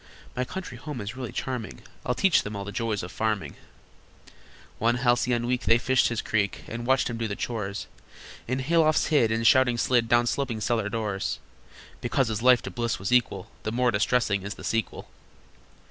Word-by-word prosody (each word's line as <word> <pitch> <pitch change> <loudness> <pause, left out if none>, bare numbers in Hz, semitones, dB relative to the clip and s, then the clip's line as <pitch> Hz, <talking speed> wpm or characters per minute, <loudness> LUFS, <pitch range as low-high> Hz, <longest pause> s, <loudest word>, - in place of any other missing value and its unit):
My 125 - 0
country 155 -6 -7
home 145 -2 -6
is 105 +2 -5
really 130 -3 -5
charming: 115 - -5 0.2
I'll 125 - -1
teach 195 -3 +4
them 105 0 -6
all 100 0 -5
the 100 - -6
joys 110 -2 -2
of 90 - -7
farming." 110 -3 -2 1.2
One 120 +2 +2
halcyon 120 -1 +1
week 125 0 -1
they 115 - +5
fished 130 +1 +2
his 120 -2 -2
creek, 105 -2 -1
And 120 +1 -5
watched 130 0 +3
him 120 - -4
do 115 0 -2
the 100 - -4
chores, 105 -4 -4 0.6
In 130 +2 -1
haylofts 155 +2 +3
hid, 130 -8 +3
and, 115 +1 0
shouting, 130 -2 +5
slid 120 -1 +2
Down 120 0 +4
sloping 120 -2 -1
cellar 110 -1 0
doors: 105 -3 -2 0.6
Because 125 0 +1
this 110 -1 -2
life 125 0 +5
to - - -5
bliss 120 -2 -1
was 95 - -4
equal 115 -6 +1
The 110 - -3
more 125 +1 +2
distressing 105 -1 +1
is 100 +2 -6
the - - -11
sequel. 115 -1 -2
120 Hz, 190 wpm, -26 LUFS, 110-125 Hz, 1.2 s, they